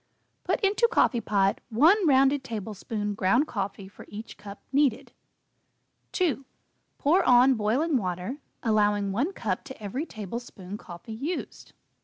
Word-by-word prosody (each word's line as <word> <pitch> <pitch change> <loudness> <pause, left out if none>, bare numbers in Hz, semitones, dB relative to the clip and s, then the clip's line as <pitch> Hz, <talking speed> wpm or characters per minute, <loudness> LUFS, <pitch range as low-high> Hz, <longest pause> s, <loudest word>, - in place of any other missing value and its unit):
Put - - 0
into 415 +3 +3
coffee 240 - +3
pot 195 -2 +1
1 325 - +4
rounded 275 0 +4
tablespoon 210 -1 -4
ground 200 +9 +2
coffee 195 -3 -4
for 195 - -14
each 215 +2 -8
cup 205 -1 -10
needed. 275 -5 +1 1.0
2. 330 -7 0 0.5
Pour 330 +7 +3
on 250 +2 +6
boiling 255 +8 +1
water, 185 +5 -3 0.3
allowing 205 -3 +2
1 260 - 0
cup 200 - -3
to 265 -1 -10
every 235 - -4
tablespoon 205 -2 -7
coffee 180 +2 -9
used. 290 +11 -5
3. - - -24
225 Hz, 135 wpm, -27 LUFS, 205-275 Hz, 1.0 s, on